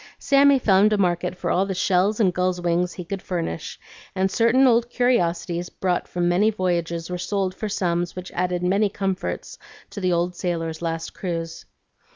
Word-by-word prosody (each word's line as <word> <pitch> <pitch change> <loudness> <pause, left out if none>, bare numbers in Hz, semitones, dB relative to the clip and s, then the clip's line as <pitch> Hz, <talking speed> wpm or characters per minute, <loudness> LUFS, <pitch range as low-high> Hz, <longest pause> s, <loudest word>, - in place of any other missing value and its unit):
Sammy 280 0 +4
found 205 -3 +4
a - - +2
market 180 -1 0
for - - -2
all 190 +2 +2
the 190 - -3
shells 190 +4 +1
and 190 -5 +3
gulls' 180 0 0
wings 175 +1 0
he 180 - -7
could 195 +2 -5
furnish, 170 - -4 0.4
and 190 0 +1
certain 235 +5 +4
old 235 -1 +3
curiosities 175 -8 0
brought 180 -2 -2
from 175 -1 -1
many 185 +5 +3
voyages 170 -4 -2
were 180 - -3
sold 195 0 -1
for 215 - -5
sums 175 -3 -1
which 180 0 -7
added 180 0 -1
many 200 +3 +2
comforts 195 - -4 0.3
to 200 - -7
the 185 -1 +1
old 175 +1 0
sailor's 165 -2 -3
last 165 -1 -3
cruise. 165 -3 -5
180 Hz, 180 wpm, -23 LUFS, 175-200 Hz, 0.4 s, Sammy